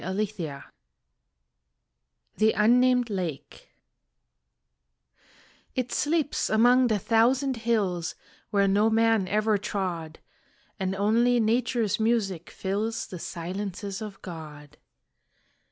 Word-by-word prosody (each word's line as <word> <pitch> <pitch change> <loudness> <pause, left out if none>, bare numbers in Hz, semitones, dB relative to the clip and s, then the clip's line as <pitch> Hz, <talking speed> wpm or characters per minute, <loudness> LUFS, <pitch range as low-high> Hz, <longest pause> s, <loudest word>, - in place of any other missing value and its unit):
Ruskin 190 -7 -3 1.7
THE 220 +1 +3
UNNAMED 245 +2 +3
LAKE 175 -8 -5 2.1
It 250 -1 -2
sleeps 300 -1 0
among 245 +3 +5
the 220 -3 +1
thousand 245 +6 +2
hills 205 -7 -1 0.3
Where 200 -2 +2
no 205 +3 +3
man 225 -3 +2
ever 215 +1 +1
trod, 180 -6 -4 0.6
And 190 0 -1
only 230 +5 +3
nature's 230 -1 +1
music 215 -7 0
fills 210 +4 -3
The 180 - -8
silences 195 +4 -5
of 210 -2 -7
God. 150 -4 -10
210 Hz, 90 wpm, -26 LUFS, 185-230 Hz, 2.1 s, among